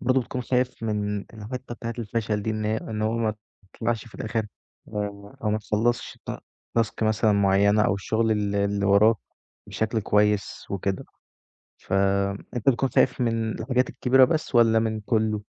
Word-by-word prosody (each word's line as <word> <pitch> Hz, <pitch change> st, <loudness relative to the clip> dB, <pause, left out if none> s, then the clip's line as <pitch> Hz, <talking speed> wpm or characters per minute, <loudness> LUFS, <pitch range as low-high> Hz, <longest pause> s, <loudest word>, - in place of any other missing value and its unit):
برضه 130 Hz, +1 st, +2 dB
بتكون 125 Hz, +1 st, -4 dB
خايف 125 Hz, -1 st, -1 dB
من 105 Hz, -2 st, -1 dB
الحِتّه 120 Hz, +4 st, -8 dB
بتاعة 115 Hz, 0 st, -5 dB
الفشل 105 Hz, -2 st, -2 dB
دي، 110 Hz, -, -1 dB
إن 110 Hz, 0 st, -2 dB
هي، 110 Hz, +1 st, +1 dB
إن 110 Hz, -1 st, -4 dB
هو 110 Hz, +1 st, +1 dB
ماتطلعش 110 Hz, +1 st, -3 dB
في 115 Hz, -, -16 dB
الآخر، 110 Hz, 0 st, -2 dB, 1.0 s
أو 105 Hz, -, +1 dB
ما 110 Hz, -, +1 dB
تخلّصش 115 Hz, +3 st, -1 dB
الت -, -, -7 dB, 0.4 s
الtask 110 Hz, 0 st, 0 dB
مثلًا 110 Hz, 0 st, +3 dB
مُعيّنة، 100 Hz, +1 st, +4 dB
أو 100 Hz, -, +2 dB
الشغل 110 Hz, +3 st, 0 dB
اللي 100 Hz, -1 st, 0 dB
اللي 100 Hz, 0 st, 0 dB
وراك 105 Hz, +3 st, +5 dB, 0.5 s
بشكل 110 Hz, +1 st, -1 dB
كويس 105 Hz, 0 st, +1 dB
وكده؟ 95 Hz, 0 st, -2 dB, 0.7 s
ف -, -, -7 dB, 0.6 s
أنتَ 120 Hz, +2 st, +2 dB
بتكون 135 Hz, +1 st, +1 dB
خايف 125 Hz, +1 st, +2 dB
من 115 Hz, -2 st, 0 dB
الحاجات 125 Hz, +2 st, +1 dB
الكبيرة 130 Hz, +1 st, +4 dB
بس، 155 Hz, -3 st, -2 dB
والّا 115 Hz, -1 st, +5 dB
من 110 Hz, -1 st, -1 dB
كلّه؟ 110 Hz, -1 st, 0 dB
110 Hz, 160 wpm, -25 LUFS, 105-115 Hz, 1.0 s, وراك